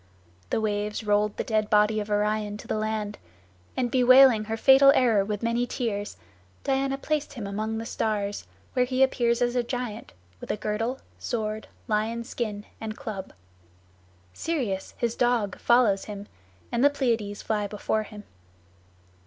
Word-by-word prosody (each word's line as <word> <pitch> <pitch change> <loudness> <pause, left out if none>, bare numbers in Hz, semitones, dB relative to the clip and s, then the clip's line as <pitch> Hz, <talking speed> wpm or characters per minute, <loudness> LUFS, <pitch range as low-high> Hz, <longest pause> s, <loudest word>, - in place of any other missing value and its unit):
The - - +1
waves 210 0 -2
rolled 210 0 +1
the - - -1
dead 215 -1 0
body 210 +1 +4
of 210 0 -5
Orion 210 0 0
to - - -12
the - - -1
land, 215 -1 -3 0.6
and 245 -2 0
bewailing 255 -3 +6
her 225 +1 -3
fatal 270 +3 +7
error 225 -6 +4
with 205 +1 -4
many 235 +1 +1
tears, 205 - -3 0.5
Diana 270 0 0
placed 295 +1 -2
him 235 -6 -6
among 215 +3 -3
the 225 - -4
stars, 205 -3 -2 0.3
where 250 -1 +3
he 255 +1 +2
appears 240 -2 +2
as 240 0 0
a 245 - +3
giant, 240 -2 -5 0.3
with - - -10
a - - -1
girdle, 215 +5 -2 0.2
sword, 215 -2 -3 0.2
lion's 230 +3 -1
skin, 210 -3 -4
and 220 0 -5
club. 215 -8 -6 1.0
Sirius, 235 - -3
his 235 -1 -1
dog, 240 -5 +1
follows 235 -5 +3
him, 205 -1 -7 0.4
and 235 +2 +1
the 285 - +7
Pleiads 230 -7 -1
fly 210 -2 -1
before 215 +1 -1
him. 210 -1 -10
220 Hz, 155 wpm, -26 LUFS, 210-245 Hz, 1.0 s, fatal